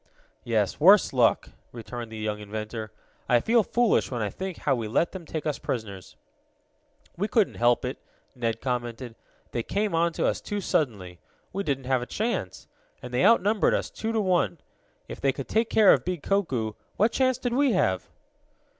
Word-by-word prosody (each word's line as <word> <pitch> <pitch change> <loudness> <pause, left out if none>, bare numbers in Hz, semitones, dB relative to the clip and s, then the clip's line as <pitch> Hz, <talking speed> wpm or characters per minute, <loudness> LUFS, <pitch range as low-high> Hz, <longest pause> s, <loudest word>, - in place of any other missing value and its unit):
"Yes, 110 -4 0
worse 190 +3 +6
luck," 125 -3 +3 0.2
returned 120 0 -7
the 110 - -7
young 105 -1 -3
inventor. 110 +1 -6 0.4
"I 120 - +5
feel 230 - +3
foolish 235 +2 +1
when 120 -4 -2
I 105 - -2
think 190 -2 -5
how 140 - +1
we 115 -4 -2
let 165 +10 +1
them 180 -4 -9
take 155 -1 -4
us 150 -2 -2
prisoners." 100 -6 -5 1.0
"We 200 +4 0
couldn't 220 -3 +2
help 120 +1 +3
it," 125 - -4 0.4
Ned 115 -2 -2
commented. 120 -1 -3 0.4
"They 120 - -1
came 205 - -1
on 165 0 +2
us - - 0
too 205 - -3
suddenly. 100 - -2 0.3
We 195 - -2
didn't 140 -7 -2
have 130 -1 +1
a 125 - -5
chance. 230 +3 -3 0.4
And - - -8
they - - +2
outnumbered 215 -2 +4
us - - -3
two 225 - -3
to 225 - 0
one. 180 -3 +1 0.5
If - - -8
they 135 - +3
could 135 0 -7
take 225 +1 +1
care 215 -3 +6
of - - +1
big 180 -4 -4
Koku, 130 - 0 0.2
what 215 +3 +3
chance 260 -2 +2
did 245 -2 -2
we 270 -1 +3
have?" 95 - +1
135 Hz, 180 wpm, -26 LUFS, -, 1.0 s, worse